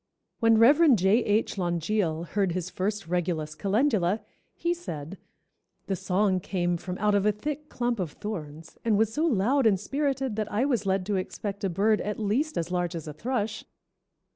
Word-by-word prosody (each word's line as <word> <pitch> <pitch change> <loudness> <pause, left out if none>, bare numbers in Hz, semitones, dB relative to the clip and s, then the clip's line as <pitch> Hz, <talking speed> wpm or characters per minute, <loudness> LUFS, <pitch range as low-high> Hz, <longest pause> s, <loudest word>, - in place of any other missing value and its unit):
When 225 -1 +5
Rev. 285 +5 +6
J. 200 +4 +3
H. 210 -1 0
Langille 170 -1 0
heard 195 -4 0
his 185 0 -3
first 200 +3 -2
Regulus 165 -3 -1
calendula, 205 - +1 0.3
he 340 0 0
said, 185 - -7 0.7
"The 195 - -1
song 185 +1 +1
came 175 -1 -1
from 180 +2 -6
out 210 0 +2
of 200 -1 +3
a - - +5
thick 300 +8 -5
clump 240 -2 -1
of 170 -5 -3
thorns, 165 -6 -7
and 220 -3 +2
was 220 0 +2
so 315 +6 +1
loud 250 +1 +3
and 195 -3 +3
spirited 270 0 -1
that 215 -1 -2
I 220 +6 +1
was 240 -8 0
led 190 -1 +1
to 200 0 0
expect 200 +2 -4
a 195 - +1
bird 210 +5 +2
at 210 0 -3
least 235 +9 0
as 170 +1 -2
large 175 -1 -1
as 160 -2 -6
a 150 - -5
thrush. 220 - -2
205 Hz, 185 wpm, -27 LUFS, 180-230 Hz, 0.7 s, Rev